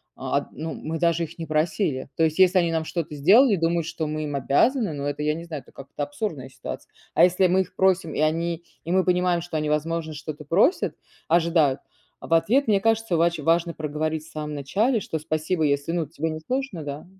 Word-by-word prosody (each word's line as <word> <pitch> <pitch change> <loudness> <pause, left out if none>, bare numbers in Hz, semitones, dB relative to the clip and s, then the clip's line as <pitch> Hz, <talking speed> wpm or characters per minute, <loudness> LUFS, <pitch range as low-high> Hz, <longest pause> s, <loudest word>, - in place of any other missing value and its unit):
а, - - -2
ну, 160 +1 -5
мы 160 +1 -5
даже 170 0 +2
их 165 +1 -8
не 165 - -5
просили. 155 -2 0
То 165 - +3
есть, 155 0 -1
если 185 0 +5
они 170 -2 +1
нам 160 -1 -1
что-то 160 -2 -4
сделали, 205 - +6
думают 165 -1 0
что 170 -1 -3
мы 155 0 -3
им 145 -1 -4
обязаны, 195 - +2
ну, 140 -1 -4
это 145 +1 -2
я 150 0 +1
не 165 +2 -7
знаю, 155 -5 -6
это - - -20
как-то 140 +2 -7
абсурдная 145 - -4
ситуация. - - -8 0.2
А 165 - +6
если 180 +1 +4
мы 185 +2 +3
их 185 - -7
просим, 190 -4 +2
и - - -3
они, 165 +2 0 0.2
и 170 - -4
мы 185 +1 +3
понимаем, 180 -1 +2
что 170 -1 -4
они, 155 0 -1
возможно, 160 +1 -1
что-то 150 0 -7
просят, 195 - +2 0.3
ожидают, 165 -4 +3 0.4
а, - - -9
в - - 0
ответ. 235 +12 +3
Мне 205 -3 +4
кажется, 225 -3 +1
вач 170 0 +2
важно 165 +3 +1
проговорить 155 0 -3
в 160 - -15
самом 150 -1 -5
начале, 210 - +1
что 160 - -4
спасибо 155 +2 -1
если 145 +2 0
ну 170 -1 0
тебе 160 +2 -3
не 155 0 -4
сложно, 250 - -3
да. 145 0 -6
165 Hz, 220 wpm, -24 LUFS, 150-180 Hz, 0.4 s, сделали